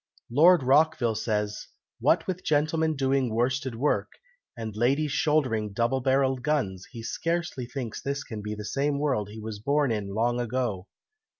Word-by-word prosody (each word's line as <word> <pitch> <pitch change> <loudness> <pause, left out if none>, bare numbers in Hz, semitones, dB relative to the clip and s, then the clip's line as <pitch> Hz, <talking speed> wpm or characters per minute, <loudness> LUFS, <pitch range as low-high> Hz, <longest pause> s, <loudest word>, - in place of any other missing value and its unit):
Lord 165 +4 +6
Rockville 135 -3 +3
says, 105 -1 -2 0.3
'What - - +3
with 185 -1 -4
gentlemen 155 +1 +1
doing 135 -2 +1
worsted 125 +2 0
work, 140 +6 0 0.4
and 110 -2 -5
ladies 135 +7 +1
shouldering 130 -9 +1
double 120 +5 +1
barrelled 130 0 +2
guns, 120 -10 -1
he 115 -3 -9
scarcely 165 -3 -2
thinks 125 -4 -5
this 140 0 -3
can 110 -2 -7
be 105 +1 -4
the 105 0 -7
same 140 +5 0
world 130 -9 0
he 110 +1 -9
was 110 -1 -6
born 140 +3 +1
in 100 -3 -3
long 120 +2 +1
ago.'" 120 -5 -2
130 Hz, 160 wpm, -27 LUFS, 110-145 Hz, 0.4 s, Lord